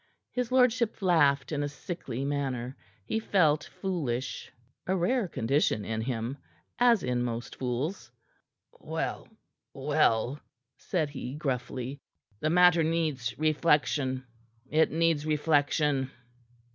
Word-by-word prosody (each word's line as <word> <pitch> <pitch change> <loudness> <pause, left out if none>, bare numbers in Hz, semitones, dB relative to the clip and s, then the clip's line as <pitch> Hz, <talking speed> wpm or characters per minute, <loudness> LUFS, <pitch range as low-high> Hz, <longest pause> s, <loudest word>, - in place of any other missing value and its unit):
His 250 -1 -2
lordship 250 -3 +3
laughed 145 -7 +3
in 145 -2 -1
a 145 - -1
sickly 140 -5 -5
manner. 135 -3 -2 0.3
He 220 - -1
felt 155 -8 +2
foolish 135 -10 -3 0.4
a 190 - +2
rare 195 +5 +1
condition 115 - +1
in 110 0 -2
him, 120 +2 -3 0.4
as 240 -3 +5
in 125 -1 0
most 120 -1 -4
fools. 125 - -3 0.7
"Well, - - -4 0.5
well," 140 -2 +1 0.4
said 155 0 -1
he 130 -2 -6
gruffly. 130 -1 -3 0.4
"The 155 - 0
matter 180 0 +6
needs 155 -8 -1
reflection. 150 -4 +1 0.5
It 155 +2 +4
needs 165 -2 +2
reflection." 145 -2 +2
145 Hz, 110 wpm, -29 LUFS, 130-165 Hz, 0.7 s, matter